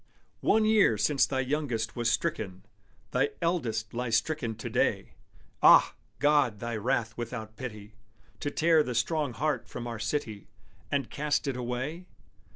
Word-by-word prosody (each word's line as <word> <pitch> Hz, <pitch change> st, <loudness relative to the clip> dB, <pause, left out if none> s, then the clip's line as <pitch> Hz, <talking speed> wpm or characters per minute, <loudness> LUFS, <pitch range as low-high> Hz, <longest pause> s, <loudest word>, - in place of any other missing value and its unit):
One 220 Hz, 0 st, +3 dB
year 215 Hz, -, +4 dB
since 135 Hz, +7 st, +3 dB
thy 130 Hz, -1 st, 0 dB
youngest 125 Hz, -5 st, -2 dB
was 120 Hz, -1 st, +1 dB
stricken: 100 Hz, -, -2 dB, 0.5 s
Thy 135 Hz, +3 st, +2 dB
eldest 115 Hz, -11 st, -1 dB
lies 120 Hz, -1 st, 0 dB
stricken 115 Hz, -2 st, -2 dB
to 110 Hz, -, -6 dB
day. -, -, 0 dB, 0.5 s
Ah! -, -, +7 dB, 0.2 s
God, 145 Hz, -5 st, +3 dB
was 105 Hz, -, -19 dB
Thy 120 Hz, -1 st, -3 dB
wrath 110 Hz, 0 st, -1 dB
without 115 Hz, -2 st, -6 dB
pity, 105 Hz, -4 st, -8 dB, 0.5 s
To 145 Hz, -, -2 dB
tear 160 Hz, +1 st, +4 dB
the 125 Hz, -4 st, -3 dB
strong 145 Hz, +3 st, 0 dB
heart 150 Hz, +6 st, -1 dB
from 120 Hz, -, -7 dB
our 115 Hz, -2 st, -5 dB
city, 110 Hz, -2 st, -3 dB, 0.4 s
And 140 Hz, -4 st, -1 dB
cast 150 Hz, 0 st, -1 dB
it 135 Hz, -, -1 dB
away? 130 Hz, +8 st, -4 dB
125 Hz, 155 wpm, -29 LUFS, 110-150 Hz, 0.5 s, Ah